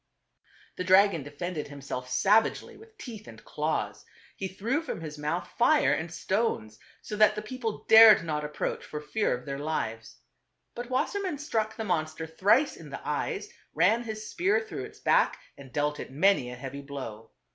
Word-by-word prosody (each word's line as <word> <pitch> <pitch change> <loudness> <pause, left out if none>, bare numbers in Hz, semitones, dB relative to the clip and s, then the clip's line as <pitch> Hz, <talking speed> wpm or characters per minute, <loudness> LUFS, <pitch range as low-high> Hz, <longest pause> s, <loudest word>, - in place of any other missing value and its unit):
The - - -2
dragon 185 -2 +5
defended 150 +3 -5
himself 140 -3 -6
savagely 205 +12 +2
with 445 0 -17
teeth 225 - -9
and - - -12
claws; - - -2 0.3
he 195 - -4
threw 230 - -1
from 325 - -5
his 155 -2 -7
mouth 155 +4 -2
fire 300 +6 +4
and 160 +1 -3
stones, 175 - -1 0.2
so 210 - -5
that 215 0 +5
the 210 - -3
people 225 -1 -5
dared 220 -4 +9
not 150 -2 -2
approach 150 0 -3
for 150 - -6
fear 150 - -1
of 125 - -14
their 140 -1 -4
lives. 115 -7 -3 0.6
But 240 +1 -6
Wassermann 365 +6 -1
struck 225 -8 -2
the 225 - -4
monster 160 -3 -1
thrice 200 - +2
in 155 -3 -11
the 140 - -8
eyes, 150 - -2 0.3
ran 195 +9 +4
his 220 -2 -6
spear 390 +5 +1
through 450 -1 -6
its - - -14
back - - +3 0.2
and 135 -2 -13
dealt 150 +1 -1
it - - -6
many 155 -3 +3
a 125 - -7
heavy 135 +3 -7
blow. 130 -6 -8
180 Hz, 175 wpm, -28 LUFS, 145-225 Hz, 0.6 s, dared